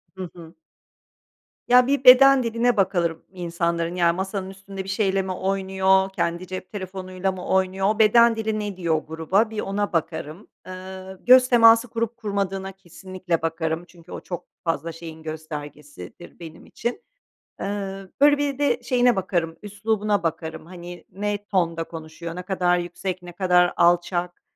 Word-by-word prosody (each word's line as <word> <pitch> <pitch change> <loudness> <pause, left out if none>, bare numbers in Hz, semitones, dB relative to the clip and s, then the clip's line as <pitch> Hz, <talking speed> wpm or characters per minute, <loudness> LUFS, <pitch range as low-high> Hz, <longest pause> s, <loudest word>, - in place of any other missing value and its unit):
Hı 185 -2 -6
hı. 165 -1 -12 1.1
Ya 250 +1 +6
bir 280 -1 +1
beden 265 +1 +8
diline 235 +1 +1
bakarım 175 -4 0
insanların, 170 -1 -2
yani, 170 -1 +2
masanın 190 0 -4
üstünde 195 0 -8
bir 190 - -9
şeyle 195 -1 +1
mi 190 0 -4
oynuyor, 190 0 +1
kendi 170 +2 -2
cep 185 0 -7
telefonuyla 185 -1 -4
mı 185 -1 -8
oynuyor, 190 +1 +1
o 215 +1 -1
beden 235 +2 +6
dili 220 -1 -2
ne 205 -3 -4
diyor 170 -3 0
o 155 - -3
gruba 160 +8 0
bir 220 - -5
ona 200 0 -2
bakarım. 160 +2 -3 0.2
Iıı, 185 0 -9
göz 255 0 +7
teması 230 0 +6
kurup 230 +1 -3
kurmadığına 195 -3 -3
kesinlikle 185 -2 -5
bakarım 165 +1 -2
çünkü 170 0 -17
o - - -5
çok 175 -3 -7 0.2
fazla 165 -1 -2
şeyin 160 -1 -10
göstergesidir 150 - -9
benim 165 -1 -11
için. 240 - -4 0.6
Eee, - - -4 0.6
böyle 290 0 +6
bir 285 -2 -1
de 290 - +1
şeyine 245 -2 +3
bakarım: 175 -4 -2
üslubuna 205 -1 -1
bakarım, 160 -1 -4
hani 175 0 -10
ne 205 +2 -3
tonda 170 -4 0
konuşuyor, 165 +1 -8
ne 180 - -6
kadar 180 -1 +1
yüksek 175 +1 -4
ne 175 0 -10
kadar 180 -1 +3
alçak, 175 +1 +1
185 Hz, 155 wpm, -23 LUFS, 170-205 Hz, 1.1 s, beden